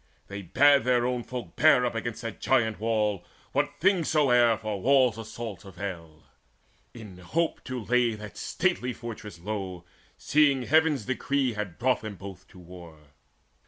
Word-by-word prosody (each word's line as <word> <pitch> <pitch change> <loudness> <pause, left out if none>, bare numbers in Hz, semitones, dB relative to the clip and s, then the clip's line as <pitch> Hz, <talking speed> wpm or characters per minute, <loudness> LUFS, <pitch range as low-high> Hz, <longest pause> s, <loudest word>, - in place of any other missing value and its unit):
They 100 0 -6
bade 140 - +4
Their 125 -1 +2
own 125 -1 -1
folk 125 0 -7
bear 150 -5 +5
against 115 -1 -4
that 115 -2 -6
giant 110 -5 +1
wall 105 -4 0 0.3
What 145 +1 0
things 185 -3 +2
soe'er 125 -7 +4
for 105 -3 -4
war's 130 -2 +3
assaults 110 -3 -7
avail, 85 -5 -8 0.7
In 105 -6 -11
hope 165 - -2
to 130 -3 -5
lay 120 -2 +2
that 105 0 -10
stately 165 -9 -1
fortress 110 -6 -9
low, 95 -2 -5 0.3
Seeing 140 -3 +3
Heaven's 155 -4 +2
decrees 130 -1 -1
had 105 -5 -5
brought 130 +1 +1
them 110 -2 -6
both 95 0 -10
to - - -18
war. 85 -2 -12
115 Hz, 150 wpm, -27 LUFS, 100-130 Hz, 0.7 s, bear